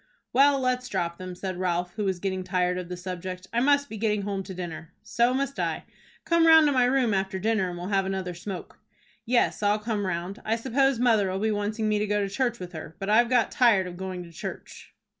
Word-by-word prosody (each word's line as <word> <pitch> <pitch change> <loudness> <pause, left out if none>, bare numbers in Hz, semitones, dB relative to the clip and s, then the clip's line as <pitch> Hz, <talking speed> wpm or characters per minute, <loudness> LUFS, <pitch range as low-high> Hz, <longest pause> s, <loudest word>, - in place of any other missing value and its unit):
"Well, 275 +2 +5
let's 250 -1 -1
drop 170 -3 -2
them," 185 -1 -6
said 185 0 -5
Ralph, 175 -1 -1
who 210 - -3
was 190 -2 0
getting 190 0 -3
tired 180 -1 0
of 180 -1 -7
the 180 - -5
subject. 185 0 -6
"I 235 - +2
must 285 +2 +3
be 220 - -7
getting 210 -1 0
home 200 -1 -2
to 190 - -7
dinner." 170 -1 -7
"So 235 +3 +2
must 275 +1 -2
I." - - -1 0.4
"Come 335 -1 +4
round 320 -1 +8
to 290 - +3
my 255 -2 +3
room, 250 -3 +2
after 190 0 -1
dinner, 210 -1 0
and 175 - -6
we'll 175 +2 -5
have 195 -2 +1
another 190 -2 -3
smoke." 185 +1 -8 0.5
"Yes, 240 -2 +2
I'll 205 0 +3
come 210 -2 -2
round. 180 +2 -4
I 220 - +1
suppose 265 +3 +1
mother'll 215 -6 +2
be 215 +2 0
wanting 210 +1 -1
me 210 -1 +1
to 210 - -1
go 210 0 +1
to 200 -1 -1
church 240 -1 0
with 180 0 -8
her, 160 0 -8
but 195 +2 -3
I've 235 +2 +5
got 245 -3 +2
tired 225 -7 +4
of 180 -1 -7
going 185 -1 -5
to 170 - -13
church." 165 - -9
205 Hz, 235 wpm, -26 LUFS, 185-235 Hz, 0.5 s, round